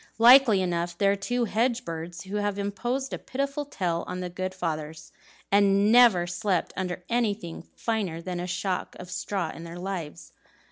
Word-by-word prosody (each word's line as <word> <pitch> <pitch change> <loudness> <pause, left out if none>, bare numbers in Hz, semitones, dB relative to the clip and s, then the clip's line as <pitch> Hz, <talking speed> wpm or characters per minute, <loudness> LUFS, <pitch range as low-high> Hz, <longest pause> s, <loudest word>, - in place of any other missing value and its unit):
likely 235 -4 +7
enough 170 -1 -2
they're 200 +1 +3
two 240 +5 -1
hedge 235 +3 0
birds, 165 0 -6
who 195 +2 -4
have 205 -1 -1
imposed 240 +7 -2
a - - -3
pitiful 275 +2 -3
tale 175 -11 -2
on 180 - -4
the 180 -1 -4
good 185 +1 -3
fathers, 160 -3 -5 0.4
and 200 +1 +4
never 230 -8 +6
slept 175 +1 -1
under 180 -1 -3
anything 215 -8 -2
finer 205 -8 -2
than 175 +1 -4
a 175 - -3
shock 180 +1 -2
of 180 0 -9
straw 185 -2 -2
in 165 - -9
their 170 +1 -8
lives." 170 -4 -6
190 Hz, 170 wpm, -27 LUFS, 175-220 Hz, 0.4 s, likely